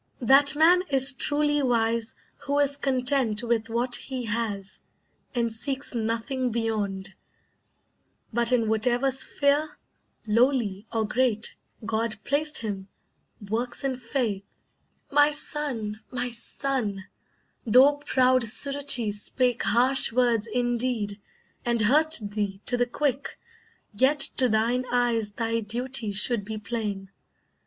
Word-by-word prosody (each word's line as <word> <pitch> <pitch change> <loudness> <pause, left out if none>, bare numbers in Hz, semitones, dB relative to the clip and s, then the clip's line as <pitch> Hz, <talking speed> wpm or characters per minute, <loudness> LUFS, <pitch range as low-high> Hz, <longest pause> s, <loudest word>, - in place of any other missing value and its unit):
That 275 +4 +5
man 340 +4 +5
is 270 0 +5
truly 295 +2 0
wise 230 -3 -1 0.3
Who 285 +1 0
is 285 -1 +3
content 255 -4 0
with 230 -1 -1
what 240 +2 0
he 255 -3 -2
has, 210 -3 -4 0.6
and 235 -2 -1
seeks 270 +5 -3
Nothing 235 +3 -2
beyond, 210 -4 -3 1.2
but 235 +1 +1
in 235 -3 +1
whatever 240 +4 +1
sphere, 285 +3 +1 0.5
Lowly 225 -3 0
or 225 -1 -1
great, 235 -2 -1 0.3
God 225 0 -2
placed 300 +2 +1
him, 200 -4 -5 0.6
works 240 +5 -3
in 270 -1 -1
faith; 230 -5 -3 0.7
My 290 +1 +5
son, 275 -8 -3
my 245 -1 -3
son, 235 -4 -3 0.6
though 260 +6 +5
proud 255 -3 +2
Suruchee 255 -1 +3
spake 245 +4 -1
Harsh 255 +3 +4
words 235 -2 +1
indeed, 240 -3 -2 0.4
and 235 -1 -1
hurt 305 +9 +3
thee 205 -2 -4
to 250 - +1
the 245 0 0
quick, 275 +1 -3 0.6
Yet 265 +7 +2 0.2
to 255 -2 +3
thine 230 +3 0
eyes 235 -4 0
thy 230 +1 -2
duty 235 +1 -2
should 210 +2 +4
be 215 +2 -6
plain. 205 -3 -5
240 Hz, 120 wpm, -25 LUFS, 220-265 Hz, 1.2 s, That